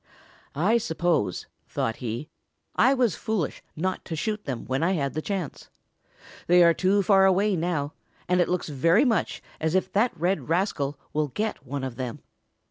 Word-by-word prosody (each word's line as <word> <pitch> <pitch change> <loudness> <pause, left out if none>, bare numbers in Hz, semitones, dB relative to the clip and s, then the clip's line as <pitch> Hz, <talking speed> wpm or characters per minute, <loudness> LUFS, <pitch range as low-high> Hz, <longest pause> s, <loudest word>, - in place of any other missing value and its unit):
"I 205 +11 +3
suppose," 160 - 0 0.2
thought 115 - -2
he, 120 +4 -4 0.5
"I 270 - +5
was 245 -7 +2
foolish 210 -9 -2
not 185 +4 -2
to 165 - -4
shoot 210 +5 -2
them 130 -5 -4
when 130 +2 -1
I 175 +3 +2
had 140 -6 -1
the 155 - -2
chance. 190 -4 -4 0.8
They 175 0 +6
are 170 0 +6
too 195 +3 +2
far 195 -1 +5
away 195 +2 +3
now, 160 -4 -1 0.3
and 180 0 +3
it - - +1
looks 180 -2 -1
very 165 - +3
much 230 -4 0 0.2
as 160 +2 0
if 190 0 +1
that 210 -4 +1
red 180 0 0
rascal 165 -5 0 0.2
will 150 0 +1
get 210 - -4
one 140 +1 -3
of 130 -3 -5
them. 125 -3 -5
175 Hz, 175 wpm, -26 LUFS, 145-195 Hz, 0.8 s, They